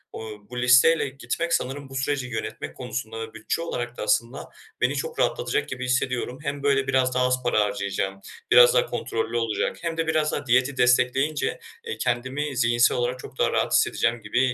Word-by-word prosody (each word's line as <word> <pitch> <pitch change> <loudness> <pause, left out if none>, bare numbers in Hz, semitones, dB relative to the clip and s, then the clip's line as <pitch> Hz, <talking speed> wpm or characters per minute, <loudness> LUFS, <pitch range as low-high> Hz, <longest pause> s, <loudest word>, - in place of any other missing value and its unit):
Iıı, 110 -1 -7
bu 125 0 -5
listeyle 125 +5 +5
gitmek 135 +5 -3
sanırım 135 +1 -2
bu 135 - -10
süreci 135 -1 -1
yönetmek 120 -3 -5
konusunda 115 -2 -5
ve 115 0 -7
bütçe 110 +8 -3
olarak 120 -7 -4
da - - -4
aslında 115 +4 -1 0.3
beni - - +2
çok 475 0 -4
rahatlatacak 435 -3 0
gibi 130 0 -4
hissediyorum. 125 0 -1
Hem 140 -1 -4
böyle 135 -1 +2
biraz 130 -1 +2
daha 125 0 +3
az 125 0 0
para 120 -3 +2
harcayacağım, 100 -1 -1 0.3
biraz - - +8
daha - - +3
kontrollü 115 - -3
olacak 115 -2 -1
hem 165 -1 -3
de 165 0 -1
biraz 155 -1 +1
daha 145 - -3
diyeti 130 +2 +2
destekleyince, 125 - +2 0.3
eee, 460 - -4
kendimi 130 +4 -2
zihinsel 120 0 +3
olarak 125 +1 -1
çok - - -11
daha - - +2
rahat - - 0
hissedeceğim 120 0 +2
gibi, 105 +3 -1
125 Hz, 185 wpm, -24 LUFS, 120-145 Hz, 0.3 s, biraz